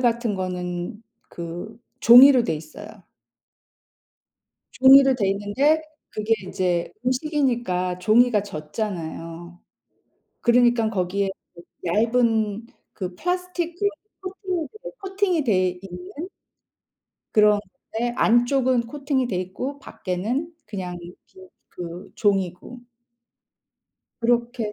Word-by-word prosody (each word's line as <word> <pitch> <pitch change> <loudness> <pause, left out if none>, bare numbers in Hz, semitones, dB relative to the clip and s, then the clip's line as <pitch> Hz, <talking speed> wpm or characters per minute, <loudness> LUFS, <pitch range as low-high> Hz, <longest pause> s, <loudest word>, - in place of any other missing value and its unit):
같은 235 -3 +1
거는 180 +3 -4 0.3
그 170 +5 -7 0.2
종이로 250 +1 +8
돼 220 - 0
있어요. 155 +6 -9 1.9
종이로 270 0 +7
돼 200 -5 0
있는데 255 +11 +1 0.3
그게 215 +1 0
이제 180 -3 -1 0.2
음식이니까 245 - 0
종이가 215 +2 +4
젖잖아요. 170 -1 -6 0.8
그러니깐 240 -2 +3
거기에 195 0 -1 0.2
그 170 - -13 0.2
얇은 225 +2 +1 0.3
그 185 -3 -5
플라스틱 360 - -3
그런 405 +1 +2 0.3
코팅이 375 -4 -4
돼 - - -6
코팅이 385 -5 0
돼 185 -6 +2
있는 190 - -8 1.0
그런 210 -1 +5 0.3
건데 240 +2 -1
안쪽은 245 +1 +3
코팅이 275 0 -1
돼 200 - -3
있고 190 +10 -4
밖에는 235 - -3
그냥 185 -4 -5
빈 175 +1 -11 0.6
그 175 0 -8
종이고 195 +4 -1 1.4
그렇게 235 -1 0
225 Hz, 215 characters per minute, -23 LUFS, 185-260 Hz, 1.9 s, 종이로